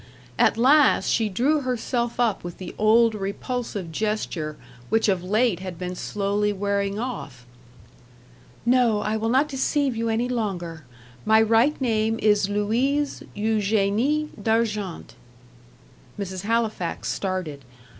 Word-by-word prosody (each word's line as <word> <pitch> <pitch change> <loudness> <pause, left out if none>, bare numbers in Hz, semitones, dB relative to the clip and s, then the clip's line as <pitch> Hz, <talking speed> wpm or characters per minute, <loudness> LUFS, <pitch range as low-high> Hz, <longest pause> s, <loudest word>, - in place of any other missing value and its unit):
At - - +4
last, 275 +4 +4
she 220 -2 +1
drew 275 +10 +1
herself 245 -2 -2
up 230 -5 +1
with 175 -1 -7
the 185 - -8
old 225 +2 +5
repulsive 200 -2 -4
gesture, 175 -6 -2 0.3
which 225 0 +2
of 190 -3 +1
late 210 0 +1
had 185 -2 -7
been 180 +1 -4
slowly 205 +2 -1
wearing 200 0 -1
off. 200 - -6 1.2
"No 240 -4 +3
I 215 +1 -1
will 220 +1 -1
not 265 +5 +3
deceive 275 -1 0
you 230 0 -1
any 225 +2 0
longer. 180 - -3 0.4
My 220 0 +5
right 225 +6 +3
name 225 -3 +1
is 210 -2 +2
Louise 245 +8 0
Eugenie 220 +7 +1
D'Argent." 210 -4 -1 1.1
Mrs. 190 -2 -4
Halifax 220 -5 -1
started. 185 -8 -3
215 Hz, 125 wpm, -24 LUFS, 195-235 Hz, 1.2 s, old